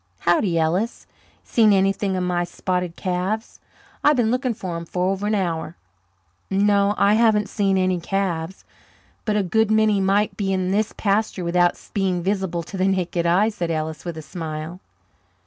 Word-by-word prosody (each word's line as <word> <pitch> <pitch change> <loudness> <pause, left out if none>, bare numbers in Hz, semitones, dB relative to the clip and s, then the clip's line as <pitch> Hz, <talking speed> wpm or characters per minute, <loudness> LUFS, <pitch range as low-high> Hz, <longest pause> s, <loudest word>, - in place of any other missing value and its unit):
"Howdy, 175 0 +2
Ellis. 175 +8 0 0.4
Seen 220 -3 +3
anything 195 0 +1
of 185 - -1
my 175 -1 0
spotted 180 -1 -3
calves? 190 +4 -3 0.4
I've 295 - +5
been 235 -3 +2
looking 250 -1 0
for 185 -4 -5
'em 170 - -4
for 180 +2 -1
over 195 +1 -2
an 215 - +1
hour." 170 -4 -2 0.7
"No, 200 +1 +2
I 200 +1 +4
haven't 215 -2 +3
seen 195 -2 +1
any 185 -1 +1
calves 185 -1 -3 0.6
but 215 -2 0
a 210 - +2
good 220 +4 +1
many 215 -2 +3
might 200 +1 +1
be 195 -1 -1
in 185 -1 0
this 210 +2 +1
pasture 205 -2 0
without 175 0 +2
being 185 -3 0
visible 190 -3 -1
to 195 - -8
the 185 +1 +2
naked 180 -3 0
eye," 190 +6 +3
said 175 -6 -4
Ellis, 155 -1 -3
with 170 -2 -5
a 160 - -7
smile. 160 +1 -6
190 Hz, 170 wpm, -22 LUFS, 175-205 Hz, 0.7 s, I've